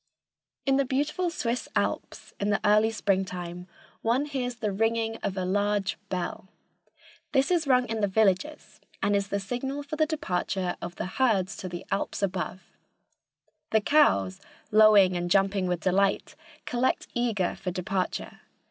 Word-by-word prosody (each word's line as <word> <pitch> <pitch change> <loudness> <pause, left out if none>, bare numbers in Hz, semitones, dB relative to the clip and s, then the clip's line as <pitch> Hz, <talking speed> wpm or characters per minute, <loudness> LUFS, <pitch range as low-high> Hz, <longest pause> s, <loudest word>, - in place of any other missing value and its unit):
In 270 0 +3
the 275 - +3
beautiful 295 +7 0
Swiss 245 -7 -2
Alps, - - -2
in 205 - 0
the 205 - +2
early 215 +1 +5
springtime, 180 -4 -2 0.3
one 240 +5 +1
hears 255 -4 -3
the 215 -3 -2
ringing 225 +2 0
of 195 -3 -4
a 185 - -1
large 205 +1 0
bell. 185 0 -4 0.9
This 270 +4 +3
is 335 -4 +2
rung 250 -2 +4
in 225 -1 -2
the 205 - +3
villages 215 +9 0 0.2
and 205 +1 +3
is 200 0 0
the 200 - -1
signal 260 +8 -4
for 295 +2 -6
the 310 0 +3
departure 190 - -2
of 175 0 -6
the - - -4
herds 195 -2 +1
to 185 - -6
the 175 0 -7
alps 200 +1 -2
above. 185 -1 -2 1.1
The 220 - +4
cows, 100 - +3 0.3
lowing 210 -4 +6
and 175 0 -2
jumping 195 0 +2
with 180 -2 -1
delight, 195 +2 +1 0.3
collect 250 +1 0
eager 225 -7 0
for 185 - -4
departure. 185 +1 -3
205 Hz, 155 wpm, -27 LUFS, 185-245 Hz, 1.1 s, lowing